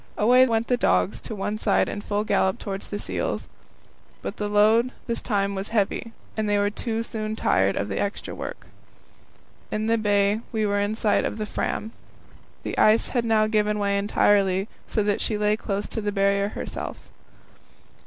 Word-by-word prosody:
Away 250 +4 +6
went 225 -1 +1
the 245 - +1
dogs 90 - +2
to 220 - -6
one 205 +2 -3
side - - +2
in 205 - -4
full 205 0 -1
gallop 195 -2 +1
towards 195 -1 -5
the 205 - -4
seals. - - -3 0.8
But - - -5
this 220 +3 +2
time 200 -3 0
the - - -4
load - - -5
was 195 +1 -3
heavy, 225 +1 -1 0.2
and 215 -1 -1
they 205 - +3
were 205 0 +1
soon 220 -2 -3
tired 100 - +2
of 100 - -1
the 100 - -3
extra 200 +1 -3
work. - - -7 1.0
In 215 0 -2
the 230 0 +2
bay 205 0 +2
we 220 -2 0
were 205 0 +1
in 205 +2 0
sight 215 -2 +2
of - - -2
the 215 - -2
Fram. 220 +1 -3 0.7
The - - -3
ice 215 +1 +5
had 240 -2 0
now 220 -1 +3
given 210 -1 +1
way 200 -1 +1
entirely, 200 -1 +2 0.2
so 215 - 0
that 205 0 0
she 215 - -1
lay 210 0 +2
close 205 -1 -3
to 225 - -3
the 205 0 -1
Barrier 200 0 +1
itself. - - -5
210 Hz, 185 wpm, -25 LUFS, 200-220 Hz, 1.0 s, Away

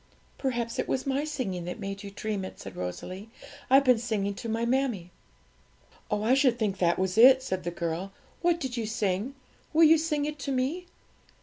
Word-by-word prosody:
'Perhaps 240 -4 -2
it - - -1
was 260 - -1
my 275 +1 0
singing 230 - -3
that 180 +5 -5
made 195 -1 -5
you 200 - -7
dream 205 0 -3
it,' 185 - -8
said 95 - -9
Rosalie; 185 - -6 0.4
'I've 270 +2 +6
been 250 -3 +5
singing 210 -4 -1
to 230 +3 -6
my 225 +1 0
mammie.' 240 -8 0 1.0
'Oh, 210 -1 -1
I 235 +4 +3
should 265 -3 +3
think 200 -4 -1
that 170 -1 +2
was 190 +2 0
it,' 260 +2 +8
said 185 -8 -3
the 175 - -2
girl. 170 +2 -3 0.3
'What 345 -1 +2
did 265 -6 -4
you 225 -2 -2
sing? 215 +3 -1 0.4
will 325 +2 +6
you 320 0 +7
sing 300 -2 0
it 300 0 -5
to 275 - -3
me?' 275 +8 -1
230 Hz, 200 wpm, -28 LUFS, 195-270 Hz, 1.0 s, it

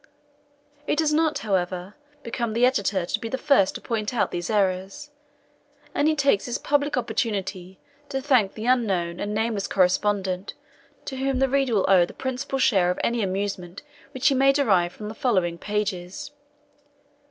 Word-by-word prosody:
It - - +2
does 305 -1 +2
not, 310 -1 +2
however, 185 -1 -1 0.3
become 235 -1 -3
the 235 +2 +4
Editor 200 -7 +1
to 215 - -2
be 225 - -5
the 260 - -2
first 265 -9 +3
to - - -6
point 220 0 -3
out 230 - +1
these 175 0 -4
errors; 195 +5 -1 0.8
and 290 - +2
he 310 - +3
takes 275 -8 +2
this 245 +1 -2
public 290 -1 0
opportunity 195 -6 -3 0.3
to 270 -1 -2
thank 255 -8 +2
the 220 - -6
unknown 195 -9 +1
and 205 - -3
nameless 220 -2 -1
correspondent, 190 0 0 0.5
to 265 - -5
whom 270 0 0
the 270 +1 +3
reader 270 -3 +1
will 195 - +2
owe 185 -3 +5
the - - -13
principal 265 +1 -3
share 195 -9 +3
of 180 - -1
any 235 0 +1
amusement 190 -2 -3 0.3
which 260 +3 0
he - - +2
may 270 +1 +5
derive 195 -11 +2
from 210 - -8
the 215 - -6
following 185 -8 0
pages. 205 0 -3
215 Hz, 170 wpm, -24 LUFS, 190-260 Hz, 0.8 s, owe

